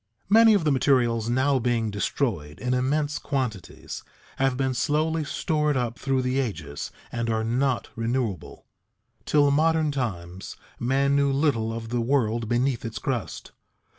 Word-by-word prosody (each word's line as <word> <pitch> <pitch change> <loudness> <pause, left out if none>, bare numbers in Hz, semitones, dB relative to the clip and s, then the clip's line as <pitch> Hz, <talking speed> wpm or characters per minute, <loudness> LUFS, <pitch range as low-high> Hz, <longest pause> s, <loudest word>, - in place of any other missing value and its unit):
_ - - -24
Many 225 0 +7
of 195 - +1
the 150 - +2
materials 120 -4 +2
now 130 +2 +2
being 115 -2 0
destroyed 100 - -2
in 125 0 -1
immense 145 +4 0
quantities 125 - -4 0.4
have 135 -1 +1
been 130 -1 0
slowly 155 +5 0
stored 150 -1 0
up 120 -1 -2
through 135 -1 0
the 130 +1 0
ages 105 - -4 0.2
and 115 -1 -2
are 110 0 0
not 125 +3 0
renewable. 115 -5 -3 0.6
Till 145 -1 +4
modern 155 +1 +2
times 95 -9 -4 0.2
man 135 +3 +2
knew 140 -1 +3
little 135 -6 +1
of 115 0 -6
the 120 0 0
world 115 -3 0
beneath 120 +1 +1
its 115 -1 -5
crust. 115 - -4
130 Hz, 150 wpm, -25 LUFS, 115-140 Hz, 0.6 s, Many